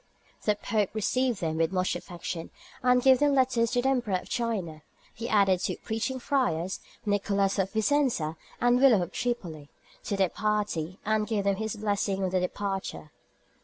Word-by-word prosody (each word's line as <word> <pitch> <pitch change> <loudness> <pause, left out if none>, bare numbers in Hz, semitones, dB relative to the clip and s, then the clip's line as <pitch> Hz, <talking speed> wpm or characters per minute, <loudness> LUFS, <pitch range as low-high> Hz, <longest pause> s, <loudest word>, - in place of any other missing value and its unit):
The 210 - +3
Pope 210 -1 0
received 240 +2 0
them 160 -1 -1
with 165 +1 +1
much 185 -1 0
affection, 170 -1 -6 0.3
and 250 -1 +4
gave 260 -1 +6
them 290 -1 +3
letters 250 -3 +3
to 245 +1 0
the - - +2
Emperor 245 -7 +1
of 180 - -4
China; 195 -10 -2 0.3
he 235 +2 -5
added 195 -4 +4
two - - -2
preaching 225 +4 -3
friars, 190 - 0 0.3
Nicholas 200 -1 +1
of 190 0 +1
Vicenza 220 - +1 0.2
and 245 0 +4
William 235 -9 +6
of 175 - -7
Tripoli, 170 -13 -3 0.4
to 200 - -1
their 190 -2 +3
party, 205 -5 -1
and 215 0 +1
gave 215 -3 0
them 200 -1 +1
his 220 0 -3
blessing 200 -2 -1
on 185 - 0
their 185 -1 +1
departure. 195 -4 -4
205 Hz, 170 wpm, -28 LUFS, 185-240 Hz, 0.4 s, gave